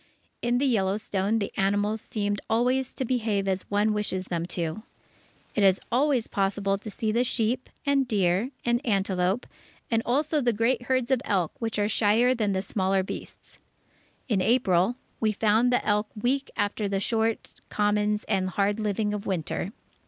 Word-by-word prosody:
In 240 0 +1
the 275 - +1
Yellowstone, 205 -2 +1
the 200 -3 -3
animals 205 +2 +1
seem 205 -2 -2
always 250 +3 +1
to 260 - -2
behave 220 -5 0
as 190 -1 -2
one 205 +1 +2
wishes 195 -3 -1
them 170 -1 -3
to! 170 +2 -3 0.7
It 210 - 0
is 190 -1 +5
always 260 -1 +2
possible 195 0 0
to 215 - -8
see 215 +1 -2
the 235 +3 +2
sheep, 245 0 -1 0.2
and 280 -2 +2
deer, 195 +1 +1 0.2
and 240 +2 +1
antelope, 195 -1 0 0.5
and 225 -1 +3
also 295 +4 +1
the 240 -2 +2
great 230 +3 +1
herds 255 -1 +1
of 260 -2 +3
elk, 190 - 0
which 225 -2 -2
are 205 0 +2
shyer 220 +4 +3
than 215 -5 0
the 190 0 -1
smaller 190 -2 0
beasts. - - -9 0.7
In 210 -7 +1
April, 195 -2 +3 0.2
we 220 -1 +2
found 220 +3 +2
the 245 - +1
elk 210 0 +2
weak 270 +5 0
after 205 +1 0
the 195 -1 -1
short 225 +2 -1
commons 210 0 +1
and 190 -3 0
hard 200 +3 0
living 210 0 0
of 210 0 -4
Winter. 180 +1 -2
210 Hz, 165 wpm, -26 LUFS, 195-240 Hz, 0.7 s, is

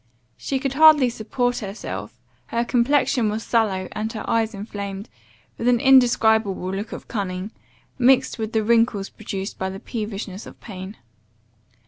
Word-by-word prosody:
] 115 - -41
She 275 - -2
could 270 0 -2
hardly 300 -4 +6
support 245 +2 -1
herself, 205 0 -6 0.3
her 235 +1 -1
complexion 245 -1 +2
was 215 +2 -3
sallow, 200 -5 +1
and 215 +1 -3
her 220 - -6
eyes 225 -1 0
inflamed, 200 0 -6 0.5
with 230 - -1
an 245 -1 +4
indescribable 220 -7 +4
look 205 +3 -4
of - - -8
cunning, 195 -2 -4 0.5
mixed 250 -1 +3
with 220 0 -3
the 220 -1 +2
wrinkles 230 -3 +2
produced 200 -2 -6
by 190 - -1
the 190 0 -7
peevishness 210 -3 -5
of - - -13
pain. 190 -1 -9
220 Hz, 150 wpm, -23 LUFS, 200-245 Hz, 0.5 s, hardly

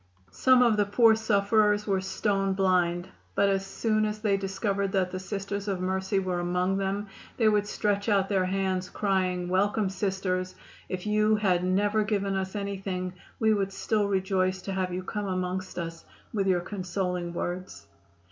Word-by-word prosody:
Some 255 - +5
of 230 -3 +3
the 205 - +3
poor 220 +3 +5
sufferers 210 -1 +2
were 195 -2 +1
stone 195 +1 0
blind, 180 -2 +1 0.3
but 200 - +3
as 195 0 +1
soon 215 +2 0
as 210 0 -1
they 210 -2 +1
discovered 195 0 -1
that 185 -2 +1
the 185 - -4
Sisters 200 +1 -4
of 195 -3 -1
Mercy 190 +2 -1
were 185 -2 0
among 180 +2 0
them 195 +1 -1 0.3
they 225 - +3
would 210 -1 +3
stretch 205 0 0
out 195 -2 +3
their 195 -2 +1
hands, 190 -1 -1
crying, 185 -3 0
"Welcome, 200 +2 +1
Sisters. 190 -1 -2 0.3
If 185 0 -4
you 215 +1 +3
had 185 -4 +2
never 205 +4 +2
given 200 -2 -1
us 190 +1 -3
anything 195 -2 -3 0.3
we 220 -1 +4
would 195 -2 0
still 205 +1 0
rejoice 190 -1 0
to 195 - -4
have 185 -1 -1
you 180 +1 -3
come 205 +2 -3
amongst 185 0 -3
us 165 -1 -5 0.3
with 200 -3 0
your 180 -2 +3
consoling 180 -2 -3
words." 180 - -5
195 Hz, 170 wpm, -28 LUFS, 185-205 Hz, 0.3 s, Some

